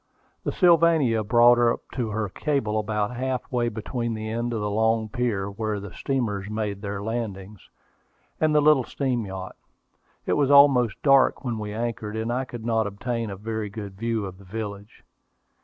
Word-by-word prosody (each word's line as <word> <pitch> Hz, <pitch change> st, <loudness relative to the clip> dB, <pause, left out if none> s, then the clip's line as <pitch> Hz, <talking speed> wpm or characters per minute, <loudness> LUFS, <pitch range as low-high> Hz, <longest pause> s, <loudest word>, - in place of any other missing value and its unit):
The -, -, -1 dB
Sylvania 165 Hz, -, +4 dB
brought 120 Hz, +2 st, +5 dB
up 120 Hz, -1 st, +2 dB
to 120 Hz, -4 st, -2 dB
her 105 Hz, 0 st, -2 dB
cable 110 Hz, -1 st, -1 dB
about 105 Hz, +1 st, -2 dB
half 130 Hz, 0 st, -3 dB
way 120 Hz, -2 st, +1 dB
between 115 Hz, +1 st, -3 dB
the 110 Hz, 0 st, -5 dB
end 120 Hz, +1 st, -2 dB
of 115 Hz, -, -2 dB
the 105 Hz, -, -2 dB
long 110 Hz, +1 st, +1 dB
pier, 115 Hz, -5 st, -1 dB
where 105 Hz, +1 st, -3 dB
the 100 Hz, -2 st, -9 dB
steamers 105 Hz, -7 st, -2 dB
made 105 Hz, -2 st, -3 dB
their 100 Hz, -1 st, -4 dB
landings, 105 Hz, -3 st, -5 dB, 0.7 s
and 155 Hz, -1 st, +2 dB
the 150 Hz, -, +5 dB
little 150 Hz, -3 st, +5 dB
steam 125 Hz, -4 st, -2 dB
yacht. 95 Hz, -1 st, -7 dB, 0.7 s
It -, -, +1 dB
was 140 Hz, -2 st, +2 dB
almost 140 Hz, -6 st, +5 dB
dark 135 Hz, -1 st, +4 dB
when 120 Hz, -3 st, -2 dB
we 105 Hz, -1 st, -5 dB
anchored, 110 Hz, -1 st, -4 dB
and 110 Hz, +2 st, -2 dB
I 130 Hz, +2 st, -1 dB
could 120 Hz, -3 st, -8 dB
not 110 Hz, -2 st, +1 dB
obtain 115 Hz, +3 st, -3 dB
a 100 Hz, -, -5 dB
very 110 Hz, +1 st, -4 dB
good 100 Hz, -1 st, -7 dB
view 115 Hz, +1 st, -2 dB
of 95 Hz, -1 st, -9 dB
the -, -, -14 dB
village. 100 Hz, +1 st, -7 dB
110 Hz, 180 wpm, -25 LUFS, 105-125 Hz, 0.7 s, brought